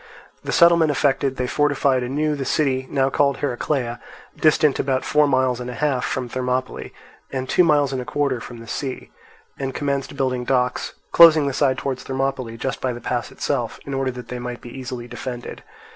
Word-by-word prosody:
The -, -, -3 dB
settlement 170 Hz, -2 st, +5 dB
effected, 140 Hz, -2 st, +1 dB
they 125 Hz, -, -1 dB
fortified 140 Hz, -1 st, +2 dB
anew 145 Hz, +5 st, 0 dB
the 140 Hz, -, -3 dB
city, 130 Hz, -2 st, 0 dB
now 135 Hz, -1 st, +1 dB
called 140 Hz, 0 st, +2 dB
Heraclea, 125 Hz, -2 st, -2 dB, 0.4 s
distant 155 Hz, -2 st, +3 dB
about 130 Hz, -1 st, 0 dB
four 150 Hz, 0 st, +3 dB
miles 130 Hz, -2 st, +1 dB
and 125 Hz, 0 st, -5 dB
a 125 Hz, -, -6 dB
half 135 Hz, -1 st, 0 dB
from 125 Hz, 0 st, -2 dB
Thermopylae 125 Hz, +1 st, -3 dB, 0.4 s
and 130 Hz, -1 st, -3 dB
two 180 Hz, -, +4 dB
miles 145 Hz, -4 st, +3 dB
and 130 Hz, -, -2 dB
a -, -, -7 dB
quarter 140 Hz, -4 st, -1 dB
from 120 Hz, -, -9 dB
the 115 Hz, -, -12 dB
sea, 130 Hz, +1 st, -5 dB, 0.5 s
and 135 Hz, -1 st, -3 dB
commenced 140 Hz, -1 st, -2 dB
building 130 Hz, -2 st, 0 dB
docks, 125 Hz, 0 st, 0 dB, 0.2 s
closing 160 Hz, -3 st, +8 dB
the 140 Hz, -, -1 dB
side 130 Hz, -1 st, +2 dB
towards 130 Hz, -1 st, -3 dB
Thermopylae 130 Hz, -3 st, -3 dB
just 135 Hz, +3 st, -3 dB
by 130 Hz, -1 st, -1 dB
the 120 Hz, -, -7 dB
pass -, -, -3 dB
itself, -, -, -2 dB
in 140 Hz, -, -5 dB
order 135 Hz, -1 st, 0 dB
that 125 Hz, -1 st, -8 dB
they 125 Hz, -, -4 dB
might 120 Hz, 0 st, -5 dB
be 120 Hz, -, -11 dB
easily 125 Hz, -2 st, -6 dB
defended. 120 Hz, 0 st, -7 dB
130 Hz, 190 wpm, -22 LUFS, 125-140 Hz, 0.5 s, closing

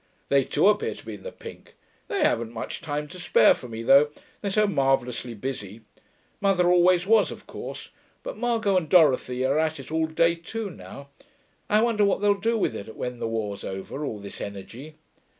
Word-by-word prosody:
'They 140 Hz, -1 st, +4 dB
too 190 Hz, -, +2 dB
appear 210 Hz, 0 st, +2 dB
to -, -, -14 dB
be -, -, -6 dB
in -, -, -10 dB
the -, -, -7 dB
pink. -, -, -12 dB, 0.3 s
They 400 Hz, -, -2 dB
haven't 115 Hz, -1 st, +1 dB
much 115 Hz, -, -6 dB
time 150 Hz, -1 st, -3 dB
to 180 Hz, -, -10 dB
spare 180 Hz, -, +5 dB
for 125 Hz, -, -10 dB
me, 115 Hz, -1 st, -6 dB
though, 140 Hz, +5 st, +6 dB, 0.3 s
they're 200 Hz, -, -2 dB
so 210 Hz, +2 st, +3 dB
marvellously 135 Hz, -, 0 dB
busy. 110 Hz, -3 st, -6 dB, 0.6 s
Mother 195 Hz, -3 st, +2 dB
always 180 Hz, 0 st, +4 dB
was, 220 Hz, +1 st, +4 dB
of -, -, -10 dB
course; -, -, -8 dB, 0.3 s
but -, -, -5 dB
Margot 225 Hz, -5 st, +1 dB
and 165 Hz, -4 st, -1 dB
Dorothy 130 Hz, -7 st, +4 dB
are 140 Hz, +3 st, +2 dB
at 160 Hz, -1 st, 0 dB
it 135 Hz, +2 st, -10 dB
all 160 Hz, 0 st, +1 dB
day 165 Hz, +1 st, +2 dB
too 200 Hz, +5 st, -6 dB
now. 140 Hz, -3 st, -11 dB, 0.6 s
I 215 Hz, +1 st, +4 dB
wonder 230 Hz, -3 st, +2 dB
what 200 Hz, -, +2 dB
they'll 205 Hz, 0 st, +4 dB
do 225 Hz, +3 st, 0 dB
with 190 Hz, -, 0 dB
it 110 Hz, +1 st, -8 dB
when 125 Hz, -1 st, -5 dB
the -, -, -2 dB
war's 110 Hz, -3 st, -3 dB
over, 95 Hz, +9 st, -5 dB
all 115 Hz, -7 st, -3 dB
this 100 Hz, -1 st, -9 dB
energy. 115 Hz, +10 st, -8 dB
155 Hz, 200 wpm, -25 LUFS, 125-200 Hz, 0.6 s, though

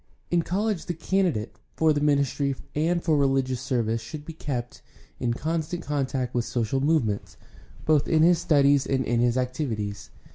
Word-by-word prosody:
— -, -, -40 dB
In 175 Hz, -1 st, +3 dB
college 200 Hz, +2 st, -1 dB
the 175 Hz, -, -2 dB
candidate 165 Hz, -, -1 dB, 0.2 s
for 160 Hz, -1 st, +3 dB
the 145 Hz, -, -1 dB
ministry 140 Hz, -1 st, +1 dB, 0.2 s
and 170 Hz, +3 st, +1 dB
for 160 Hz, -3 st, +2 dB
religious 135 Hz, -3 st, +1 dB
service 115 Hz, -4 st, 0 dB
should 145 Hz, +7 st, -8 dB
be 165 Hz, -, -7 dB
kept 125 Hz, -6 st, -5 dB, 0.4 s
in 120 Hz, -, 0 dB
constant 160 Hz, +6 st, -2 dB
contact 135 Hz, -3 st, -2 dB
with 120 Hz, -, +1 dB
social 120 Hz, +3 st, -1 dB
movements, 135 Hz, -9 st, 0 dB, 0.5 s
both 155 Hz, -2 st, +3 dB
in 155 Hz, -1 st, +4 dB
his 170 Hz, 0 st, +5 dB
studies 140 Hz, -4 st, +3 dB
and 130 Hz, -2 st, 0 dB
in 120 Hz, -, +1 dB
his 120 Hz, +1 st, +2 dB
activities. 110 Hz, -6 st, -3 dB
140 Hz, 170 wpm, -26 LUFS, 120-160 Hz, 0.5 s, his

